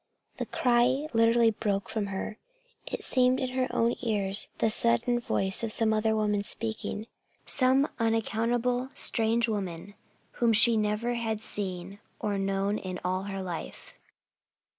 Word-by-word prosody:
The - - -4
cry 250 +4 +2
literally 230 0 +4
broke 205 -2 -2
from 220 -2 -3
her. 200 +3 -5 0.5
It - - -4
seemed 255 0 +2
in 260 - -2
her 255 0 -1
own 235 +1 +1
ears 205 -4 +1
the 220 - +1
sudden 215 - +1
voice 195 -5 0
of 225 - -2
some 220 0 +1
other 220 0 +1
woman 210 -1 0
speaking 220 0 -3 0.4
some 265 +2 +5
unaccountable, 230 +3 0
strange 230 +1 +2
woman 200 -3 -4 0.5
whom 235 -1 +4
she 230 +2 +6
never 215 +3 0
had 225 -2 -2
seen 195 -2 0 0.2
or 205 -2 -2
known 195 +1 -1
in 185 -1 -6
all 185 +1 -1
her 195 -1 -5
life. 175 -3 -7
220 Hz, 140 wpm, -28 LUFS, 200-235 Hz, 0.5 s, she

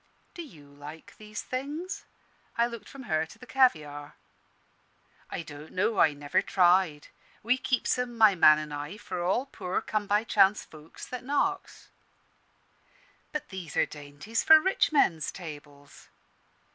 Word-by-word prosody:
"Do 345 - -7
you 165 - -13
like 145 +3 -12
these 215 0 -7
things?" 300 +9 -5 0.5
I 235 - +4
looked 235 -3 -8
from 275 -1 -10
her 160 -7 0
to 215 - -15
the 255 - -13
caviare. 155 - +1 1.1
"I - - -5
don't 150 0 -11
know. 205 +3 0
I 155 - +5
never 145 0 0
tried. 180 -5 +2 0.3
We 250 +4 +2
keeps 255 0 0
'em, 245 -1 -3
my 220 -3 +7
man 155 -4 +7
an' 155 -1 -6
I, 145 +7 -6
for 175 - -5
all 195 +9 +1
poor 185 -9 -3
come 210 -1 -3
by 210 +2 +2
chance 210 -2 +3
folks 155 0 -12
that 250 -1 -6
knocks." 330 +8 -2 1.4
"But 300 0 -5
these 180 -6 -7
are - - +4
dainties 150 +9 -5
for 315 0 +9
rich 380 +2 +1
men's 170 - +2
tables." 145 -4 -11
190 Hz, 150 wpm, -28 LUFS, 150-250 Hz, 1.4 s, for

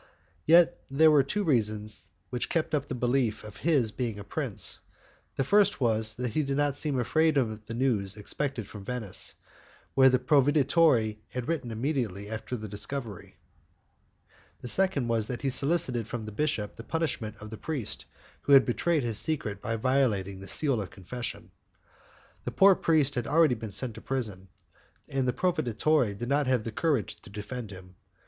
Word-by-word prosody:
Yet, 170 +1 +6
there 155 +4 +5
were 150 -2 +6
two 205 +10 -1
reasons 110 - 0 0.2
which 125 - -2
kept 165 -1 -1
up 145 -2 0
the 130 - -4
belief 125 -2 0
of 105 -2 -10
his 140 -9 +2
being 115 -1 -3
a 100 - -7
prince: 100 - -1 0.6
the 135 - +1
first 200 +6 +3
was 110 -3 +1
that 125 -2 -3
he 155 - +2
did 140 -1 -2
not 145 -1 +1
seem 145 -2 -1
afraid 155 +4 +2
of 110 -5 -1
the 115 - -5
news 110 -6 0
expected 125 +1 -3
from 105 -2 -10
Venice, 110 -3 -2 0.6
where 130 0 +6
the 130 - +3
proveditore 135 -3 +3
had 125 0 -5
written 160 -7 -2
immediately 110 -5 -2
after 110 +3 -4
the 110 -1 -7
discovery; 105 +1 -6 1.3
the - - -6
second 185 -5 +3
was 115 -2 0
that 125 +1 -5
he 135 - +1
solicited 130 -6 +1
from 115 -1 -5
the 110 - -6
bishop 110 -4 -2
the 115 - -8
punishment 130 -9 -2
of 105 0 -10
the - - -5
priest 145 -6 -3 0.4
who 140 - +2
had 135 -1 +8
betrayed 155 +4 +1
his 115 -3 0
secret 110 - -2
by 115 - -2
violating 110 -6 0
the 95 - -10
seal 135 -4 +1
of 95 - -6
confession. 120 +6 -7 0.9
The - - -4
poor 195 0 +6
priest 155 -6 +2
had 120 -3 -2
already 160 -2 +4
been 110 -2 -5
sent 115 +4 -2
to - - -11
prison, 105 -8 -3 0.6
and 135 -2 -1
the - - +3
proveditore 155 -5 +1
had 120 - -4
not 140 +1 +1 0.2
the 115 - -4
courage 140 - 0
to 115 - -14
defend 105 +3 -6
him. 95 -2 -12
125 Hz, 175 wpm, -28 LUFS, 110-145 Hz, 1.3 s, had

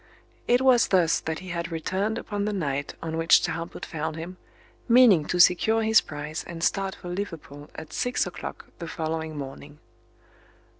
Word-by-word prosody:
It 245 +1 +4
was 255 -3 +5
thus 175 -4 +3
that 160 0 -4
he - - -8
had 170 0 -4
returned 190 +7 -2
upon 205 -3 -3
the 210 - -1
night 145 -7 -3
on 160 0 -3
which 165 +1 +5
Talbot 165 +1 -4
found 160 -1 -4
him, 170 +3 -7 0.5
meaning 230 -10 +6
to 180 - -2
secure 220 +6 +5
his 220 0 +5
prize 150 0 -6
and 165 -1 -7
start 195 +1 0
for 180 - -9
Liverpool 165 -6 -6
at 160 - -9
six 245 0 0
o'clock - - -7
the 170 - -6
following 160 -1 -4
morning. 140 +1 -8
170 Hz, 165 wpm, -26 LUFS, 160-200 Hz, 0.5 s, meaning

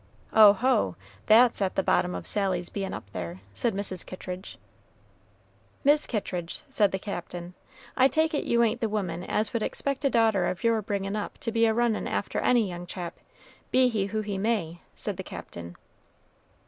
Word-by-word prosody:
"Oho! 215 - +5 0.3
that's 235 0 +6
at 190 -1 0
the 195 - +1
bottom 180 0 +2
of - - -6
Sally's 185 -4 -1
bein' 195 -1 -4
up - - -7
there," 90 -1 -6
said 230 - -1
Mrs. 195 -3 -3
Kittridge. 185 0 -8 1.3
"Mis' 295 +2 +4
Kittridge," 180 -6 -3
said 210 -6 +3
the 190 - -1
Captain, 175 -2 -6 0.4
"I 260 - +6
take 315 +3 +1
it 290 - 0
you 235 0 +3
ain't 230 +1 0
the 225 - +1
woman 180 -5 -2
as 215 +3 -1
would 230 - 0
expect 275 +5 -2
a 275 - +4
daughter 225 -6 +3
of 180 - -3
your 230 -1 +3
bringin' 200 -1 -2
up 210 - -4
to 240 -6 -2
be 230 0 +3
a 220 - +2
runnin' 235 -2 +1
after - - -2
any 240 -4 +3
young 175 -1 -7
chap, 175 -1 -6 0.5
be 255 -1 +4
he 210 -4 0
who 215 +2 -2
he 205 -2 -3
may," 195 -6 -1
said - - -3
the - - -4
Captain. 85 0 -9
205 Hz, 180 wpm, -27 LUFS, 180-230 Hz, 1.3 s, that's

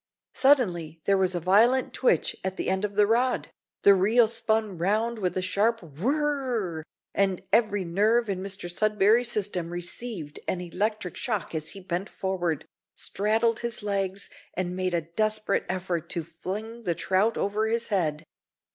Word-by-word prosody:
Suddenly 180 - +2
there 200 - +4
was 185 -1 +1
a - - 0
violent 220 +9 +3
twitch 485 - +2
at 190 0 -3
the - - -1
end 190 +1 -1
of 205 -1 -2
the 210 0 +5
rod, 240 +4 +1 0.3
the 200 - +8
reel 220 +5 +4
spun 220 -4 0
round 220 +6 0
with 185 -2 -1
a 185 - 0
sharp 220 +3 +1
whirr 250 - -1
r, 155 - -6 0.3
and 195 -2 +1
every 205 -4 +3
nerve 215 +7 +2
in 190 -2 -2
Mr 195 -1 -3
Sudberry's 215 +5 +3
system 195 -6 0
received 175 -1 -5
an 185 - -1
electric 200 +2 -2
shock 215 -9 -2
as 155 -1 -3
he - - -9
bent 180 +2 -3
forward, 175 -5 -2 0.3
straddled 220 +3 +1
his 235 -2 -2
legs, 195 -1 -1 0.3
and 180 0 -2
made 185 -1 -1
a 170 - +1
desperate 215 +5 0
effort 180 -3 -2
to 170 - -3
fling 210 +8 -6
the 175 -7 -1
trout 195 +7 +1
over 210 +2 0
his 230 +1 -1
head. 160 -7 0
200 Hz, 165 wpm, -27 LUFS, 180-225 Hz, 0.3 s, the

